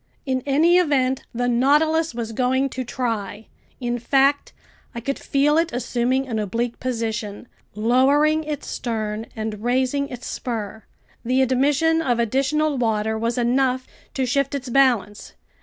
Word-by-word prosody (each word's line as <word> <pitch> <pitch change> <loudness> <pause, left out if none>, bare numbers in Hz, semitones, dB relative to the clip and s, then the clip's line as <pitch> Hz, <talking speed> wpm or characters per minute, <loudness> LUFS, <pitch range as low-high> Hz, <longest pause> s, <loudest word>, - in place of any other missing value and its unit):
In 260 -2 -1
any 325 +6 +4
event 265 -6 +1
the 245 +1 -1
Nautilus 295 +5 +2
was 230 -1 -4
going 260 +4 +1
to 260 0 -4
try. 225 -4 -3 0.3
In 240 -1 -2
fact, 275 +4 +2 0.4
I - - -3
could 275 +4 -3
feel 295 +3 +2
it 335 0 0
assuming 250 +2 -1
an 225 -3 -2
oblique 230 +4 -2
position, 225 -3 -3 0.3
lowering 275 +8 +3
its 300 -2 -5
stern 220 -2 -3
and 215 -1 -4
raising 260 +3 +1
its 250 -1 -8
spur. 220 -3 -5 0.4
The 255 +2 +2
admission 290 +5 +2
of 245 -6 +1
additional 275 +5 +1
water 220 -2 0
was 230 +2 -2
enough 255 +1 +1 0.3
to 265 - 0
shift 275 +2 0
its 265 -2 -5
balance. 235 -6 +1
255 Hz, 140 wpm, -22 LUFS, 230-275 Hz, 0.4 s, any